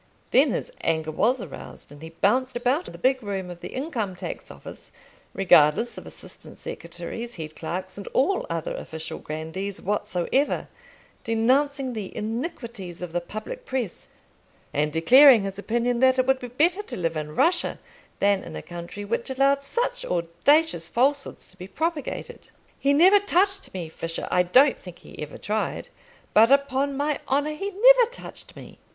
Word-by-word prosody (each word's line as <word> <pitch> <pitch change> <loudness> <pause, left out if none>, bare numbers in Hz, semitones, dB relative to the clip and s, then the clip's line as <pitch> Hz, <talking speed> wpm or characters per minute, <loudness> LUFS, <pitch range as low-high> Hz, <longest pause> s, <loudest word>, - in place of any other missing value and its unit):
Then - - +5
his - - -3
anger 160 -1 0
was 235 +8 +1
aroused, 145 -3 -10
and 145 0 -13
he 160 - -8
bounced 250 +10 +1
about 255 +8 0
the - - -9
big 260 0 +2
room 195 -4 -4
of 175 0 -11
the - - -5
Income 245 - -3
tax 180 -1 -7
Office, - - -11 0.4
regardless 180 +4 +4
of - - -9
assistant - - -10
secretaries, 235 +1 -7
head 155 -2 -7
clerks, 185 +4 -5
and 200 - -8
all 375 +9 +1
other 165 -1 -3
official 160 0 -7
grandees 160 +6 -5
whatsoever, 205 +6 -1 0.5
denouncing 260 +4 +1
the 210 -4 -6
iniquities 225 - -5
of 175 - -5
the 175 - 0
public 215 - -7
press, 250 - -4 0.7
and 150 +1 +1
declaring 245 - +7
his 195 0 -5
opinion 235 +3 0
that 260 0 +4
it 255 - +3
would 265 0 +2
be 250 - -6
better 330 - +1
to 415 - -6
live 165 -2 -1
in 150 0 -5
Russia 345 - +2 0.4
than 200 -1 +2
in 80 - -9
a 75 - -6
country 175 +4 -8
which 235 +4 -2
allowed 275 +1 +2
such - - -2
audacious 170 - +1
falsehoods 275 +3 0
to - - -14
be 180 - -8
propagated. 315 - -4 0.3
"He 280 - +2
never 365 +8 +6
touched 390 0 +1
me, 175 -3 -4
Fisher; 165 +1 -5
I 180 - +4
don't 255 +11 +4
think 180 -2 -11
he - - -12
ever 150 -1 -7
tried; 215 +1 -3 0.4
but, 225 +2 +7
upon 280 0 +2
my 290 +1 0
honour, 290 +3 +1
he 390 +7 -4
never 485 +4 +6
touched - - -10
me." - - -12
235 Hz, 165 wpm, -25 LUFS, 175-280 Hz, 0.7 s, declaring